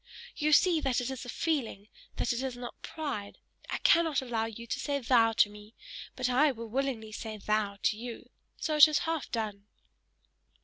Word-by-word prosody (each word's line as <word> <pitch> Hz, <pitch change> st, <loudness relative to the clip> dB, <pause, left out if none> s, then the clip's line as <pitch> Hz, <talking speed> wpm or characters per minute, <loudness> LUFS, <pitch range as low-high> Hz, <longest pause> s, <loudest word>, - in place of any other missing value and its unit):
You 305 Hz, 0 st, 0 dB
see 330 Hz, +1 st, +5 dB
that 265 Hz, -4 st, +1 dB
it 250 Hz, +1 st, -3 dB
is 260 Hz, -1 st, -6 dB
a -, -, -8 dB
feeling; 250 Hz, -10 st, -2 dB, 0.3 s
that -, -, 0 dB
it 240 Hz, -, -3 dB
is 260 Hz, -2 st, -4 dB
not 245 Hz, 0 st, -8 dB
pride: 275 Hz, -11 st, -5 dB, 0.3 s
I -, -, -1 dB
cannot 330 Hz, -4 st, +4 dB
allow 235 Hz, -4 st, -2 dB
you 225 Hz, +1 st, -8 dB
to -, -, -3 dB
say 285 Hz, -1 st, -1 dB
THOU 230 Hz, -3 st, +4 dB
to 205 Hz, -, +5 dB
me, 210 Hz, +2 st, -14 dB, 0.4 s
but 255 Hz, -1 st, -1 dB
I 275 Hz, +4 st, +4 dB
will 230 Hz, -2 st, -8 dB
willingly 245 Hz, -3 st, -2 dB
say 215 Hz, 0 st, -6 dB
THOU 210 Hz, -1 st, -1 dB
to 215 Hz, -, +2 dB
you, 235 Hz, +1 st, -8 dB, 0.3 s
so 310 Hz, -, -1 dB
it 300 Hz, +1 st, +10 dB
is 305 Hz, -1 st, +1 dB
half 325 Hz, -2 st, -2 dB
done!" 210 Hz, -3 st, -4 dB
245 Hz, 190 wpm, -30 LUFS, 220-285 Hz, 0.4 s, it